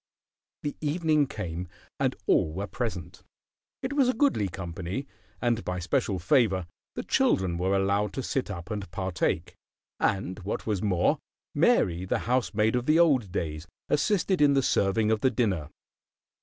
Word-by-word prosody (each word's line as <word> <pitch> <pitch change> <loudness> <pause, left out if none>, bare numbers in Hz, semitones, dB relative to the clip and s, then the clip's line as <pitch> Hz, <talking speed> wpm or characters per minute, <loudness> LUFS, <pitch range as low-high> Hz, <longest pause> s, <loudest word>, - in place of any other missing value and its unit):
The 145 - -3
evening 155 -1 +2
came, 90 -6 -5 0.3
and - - +1
all 75 - +3
were 100 +4 -3
present. 105 - -5 0.6
It 260 +2 -2
was 275 -3 +3
a 255 - +1
goodly 250 - +2
company, 90 +7 -5 0.3
and 120 -2 0
by 90 0 -3
special 95 +2 0
favor 95 0 +2 0.3
the - - -3
children 95 -3 +2
were 95 +3 +1
allowed 100 +1 +1
to 135 - -3
sit 130 -2 -2
up 85 -2 -6
and 100 -4 -4
partake; 90 -2 -1 0.5
and, 95 0 0
what 100 +1 -4
was 105 -4 -1
more, 90 -5 +2 0.3
Mary, 85 0 +3
the - - 0
housemaid 110 -2 +1
of 125 0 -1
the 155 +1 +5
old 135 - +4
days, 80 -3 -3 0.2
assisted 185 +3 +2
in 145 -1 +5
the 135 - +3
serving 105 0 +2
of 110 -1 +1
the 130 - +4
dinner. 95 -12 0
105 Hz, 155 wpm, -27 LUFS, 90-130 Hz, 0.6 s, the